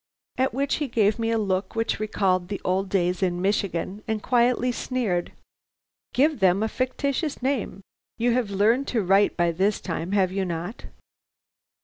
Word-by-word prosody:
"At 260 +1 +2
which 275 +3 0
he 295 - -2
gave 220 -2 +2
me 225 0 0
a 230 - +1
look 190 -2 -1
which 225 -2 -1
recalled 190 -4 0
the 200 +1 -4
old 190 +1 0
days 180 -1 0
in 175 -2 0
Michigan, 195 0 -1
and 220 -1 -2
quietly 245 0 +2
sneered: 230 -8 -2 0.8
"'Give 290 +1 +2
them 190 +1 +3
a - - +1
fictitious 265 +4 -2
name. 255 -7 -1 0.4
You 240 +1 +2
have 245 -4 0
learned 220 +7 +2
to 225 -4 0
write 195 +2 +3
by 175 -1 +2
this 195 +5 +1
time, 170 +1 -4
have 190 -3 +2
you 195 0 -1
not?' 175 +5 -5
205 Hz, 165 wpm, -25 LUFS, 185-245 Hz, 0.8 s, them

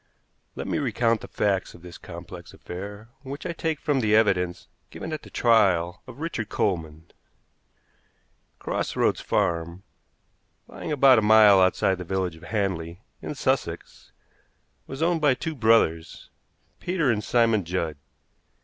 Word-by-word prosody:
Let - - -5
me - - -1
recount 115 -4 0
the - - -9
facts 100 -2 -1
of 85 - -16
this 90 -1 -11
complex 85 0 -10
affair, 100 +5 -8
which 140 +4 -8
I 170 - -3
take 160 -2 -2
from 145 -4 0
the 105 -3 +2
evidence 95 -5 +1 0.2
given 160 - -7
at 155 - -4
the - - -14
trial 95 -7 +2
of - - -11
Richard 135 -10 -4
Coleman. 80 -4 -3 1.5
Cross - - -3
Roads - - +1
Farm, 85 +2 -1 0.8
lying - - -7
about 135 -4 +6
a - - 0
mile 105 -2 +6
outside 95 0 +2
the - - -4
village 95 -1 -2
of 80 - -16
Hanley, 95 -3 -3 0.2
in - - -6
Sussex, 130 -11 -3 0.8
was 135 +4 -4
owned 170 -1 +1
by 145 -4 +4
two 160 +4 -4
brothers, 110 - +1 0.5
Peter 170 -7 0
and 105 -2 -1
Simon 115 -4 +2
Judd. 85 -3 -3
105 Hz, 145 wpm, -25 LUFS, 90-130 Hz, 1.5 s, about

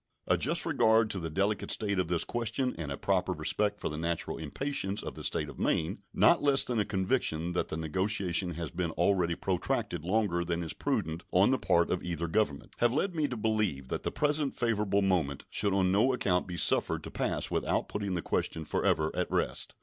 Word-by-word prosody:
A - - +3
just - - +1
regard 110 0 +3
to 95 - -2
the 80 -1 -4
delicate 100 +5 -1
state 100 -3 0
of 90 - 0
this 85 -1 0
question 120 +2 -2
and 75 -4 -5
a 70 - -3
proper - - 0
respect 105 -1 -1
for - - -3
the 75 0 -4
natural 85 0 -2
impatience 100 - -3
of - - -5
the - - -9
State - - 0
of - - -10
Maine, 90 +5 0
not 170 - +5
less 140 -1 +5
than 120 -3 -1
a 105 - +2
conviction 95 -5 -1
that 90 - -1
the 80 - -4
negotiation 90 +1 -1
has 85 0 -5
been 90 -1 -2
already 85 0 +2
protracted 85 -3 -2
longer 90 -2 +1
than 85 0 -2
is 80 - -3
prudent 80 +2 -2
on 95 +6 +4
the 130 - +1
part 85 0 +2
of 90 - 0
either 85 -1 -2
Government, 80 -5 -1
have 120 0 +4
led 185 +5 0
me 155 -3 0
to 125 - -5
believe 105 -12 0
that - - -2
the - - -2
present 150 -1 0
favorable 105 -4 +1
moment 85 -8 0
should 105 -1 +1
on 95 -1 +2
no 110 +7 +3
account 90 -7 +1
be 90 -1 -5
suffered - - +2
to - - -8
pass - - -1
without - - 0
putting 100 -2 -3
the 85 - -3
question 80 -1 -2
forever 80 +1 +1
at - - -1
rest. - - -2
95 Hz, 210 wpm, -30 LUFS, 85-110 Hz, -, not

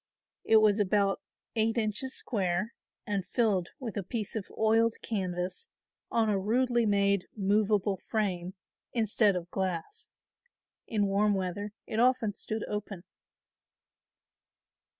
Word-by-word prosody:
It 225 - +3
was 215 -1 +4
about 200 0 +2 0.3
eight 225 +1 +1
inches 225 +4 0
square 195 -1 0 0.3
and 200 -2 -1
filled 200 -5 +1
with 230 -7 -5
a - - 0
piece 215 +3 -4
of 210 -3 -3
oiled 225 +1 +3
canvas 185 - -2 0.4
on 225 -1 +2
a 205 -2 +2
rudely 240 +3 +2
made 200 -2 +2
movable 205 0 +2
frame 190 -4 -2 0.4
instead 215 -3 +3
of 175 -1 -5
glass. 190 - -3 0.8
In 210 -3 +1
warm 200 +1 +2
weather 195 +2 -3
it 220 - -3
often 245 -3 +3
stood 215 +2 -4
open. 210 -3 -5
210 Hz, 120 wpm, -30 LUFS, 195-225 Hz, 0.8 s, was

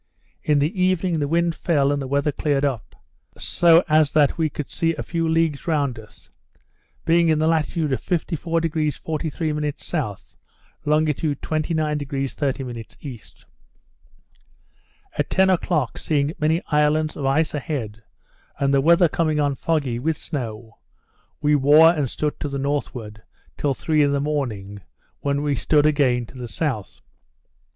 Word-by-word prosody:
In 150 -1 +2
the 155 +7 0
evening 185 -2 +1
the 145 - 0
wind 170 +2 +1
fell 145 -5 +1
and 145 -1 -1
the 135 - -4
weather 140 +2 +1
cleared 145 -1 0
up, 130 -6 -3 0.4
so 170 0 +4
as 155 -2 +3
that 150 -2 +4
we 160 -2 0
could 150 -2 -6
see 165 0 0
a - - -4
few 165 -1 -1
leagues 160 -2 0
round 140 -7 0
us; 105 -1 -15 0.7
being 170 0 +4
in 155 - +3
the 155 - +1
latitude 160 -1 0
of 130 - -1
54° 165 -3 -1
43' 155 -1 -2
S. 130 - -4 0.6
longitude 150 -1 +1
29° 150 -3 -1
30' 130 -5 -3 0.2
E. 120 -5 -8 2.0
At - - 0
ten 190 0 +3
o'clock, 160 -7 0
seeing 145 -1 0
many 160 +3 +1
islands 150 +1 +2
of 140 - -2
ice 155 +4 +1
a 150 - -1
head, 115 -7 -5 0.6
and 140 0 +1
the 135 - +4
weather 170 +4 +5
coming 155 -1 0
on 145 -1 +1
foggy, 140 -5 -1
with 155 +4 -1
snow, 115 -6 -6 0.6
we 150 0 +3
wore 150 +4 +6
and 145 -6 -1
stood 150 +4 -3
to 145 - -3
the 140 - -3
northward, 125 -6 -3 0.3
till 140 -2 -1
three 155 +2 +1
in 140 -1 +3
the 140 - +1
morning, 115 -9 -3 0.4
when 140 0 -1
we 145 -1 +1
stood 145 +3 +2
again 135 -5 +2
to 130 +3 -13
the 120 - -5
south. 115 -3 -3
150 Hz, 155 wpm, -22 LUFS, 135-160 Hz, 2.0 s, wore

